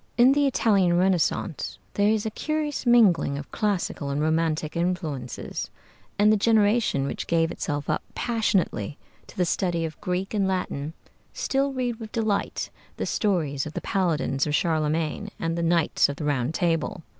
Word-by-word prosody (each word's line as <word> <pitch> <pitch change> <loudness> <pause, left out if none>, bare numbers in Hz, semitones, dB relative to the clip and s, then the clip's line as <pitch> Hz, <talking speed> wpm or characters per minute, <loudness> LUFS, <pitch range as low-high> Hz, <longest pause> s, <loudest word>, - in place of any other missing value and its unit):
In 250 +2 +7
the 285 0 +3
Italian 195 -9 +3
Renaissance 180 -2 0 0.2
there 205 +1 +3
is 215 -1 +1
a 220 - -1
curious 300 +1 -2
mingling 205 -12 +4
of 145 - -8
classical 190 -8 -1
and 140 +1 -1
romantic 160 0 0
influences, 165 -8 -3 0.5
and 210 +1 +5
the - - +3
generation 215 - +3
which - - -4
gave 165 0 +2
itself 145 -1 -3
up - - 0
passionately 195 - 0 0.3
to - - -15
the 180 - +2
study 170 -1 0
of 155 - -7
Greek 185 +1 -2
and 200 -2 +1
Latin 160 -5 -2 0.4
still 275 +1 0
read 245 -3 -2
with 220 -2 -8
delight 220 -3 -1 0.3
the - - -2
stories 155 -10 0
of 155 - -8
the - - -4
Paladins 155 -7 0
of 150 - +1
Charlemagne 160 +4 0
and 165 0 -1
the 170 - -2
Knights 170 -3 +3
of 140 - -3
the 150 - -5
Round 140 -2 0
Table. 165 -1 0
175 Hz, 165 wpm, -25 LUFS, 155-215 Hz, 0.5 s, In